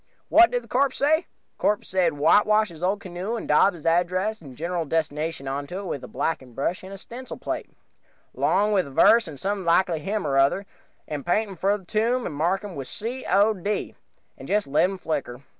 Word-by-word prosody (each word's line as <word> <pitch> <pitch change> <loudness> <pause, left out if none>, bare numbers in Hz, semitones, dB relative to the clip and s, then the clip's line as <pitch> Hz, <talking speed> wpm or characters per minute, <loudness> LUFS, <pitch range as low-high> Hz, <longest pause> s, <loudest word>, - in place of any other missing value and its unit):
What 345 +1 +7
did 245 -1 -3
corpse 265 +3 +1
say? 315 +4 +2 0.3
"Corpse 210 0 +1
said, 180 -3 +1
whitewash 210 +8 +4
his 165 -2 -12
old 195 +4 0
canoe 185 +3 -4
and 230 - -5
dob 175 +6 +4
his 165 - -13
address 180 +5 +1
and 135 -5 -11
general 170 +1 -2
destination 155 -1 -2
onto 140 +6 -4
it 200 - -5
with 145 -7 -4
a - - -7
blacking 130 -3 -3
brush 170 +6 -1
and 190 - -10
a 195 - -7
stencil 245 +6 -9
plate, - - -4 0.6
'long 210 +1 +2
with 185 -7 +2
a - - -9
verse 230 - +5
from 155 -5 -9
some 195 +4 -2
likely 170 -1 +2
hymn 200 +4 -2
or 135 -2 +1
other, 140 +9 +2 0.4
and 150 -2 -4
pint 205 +4 0
him - - -8
for 195 +4 +1
the 190 - -17
tomb, 230 +6 0
and - - -4
mark 175 +7 0
him 180 -9 -6
C. 235 - -6
O. 205 +3 +4
D., 205 +2 -3 0.5
and - - -9
just 210 0 +1
let 145 +5 +3
him 195 - -5
flicker. 140 -7 -4
185 Hz, 210 wpm, -25 LUFS, 155-210 Hz, 0.6 s, What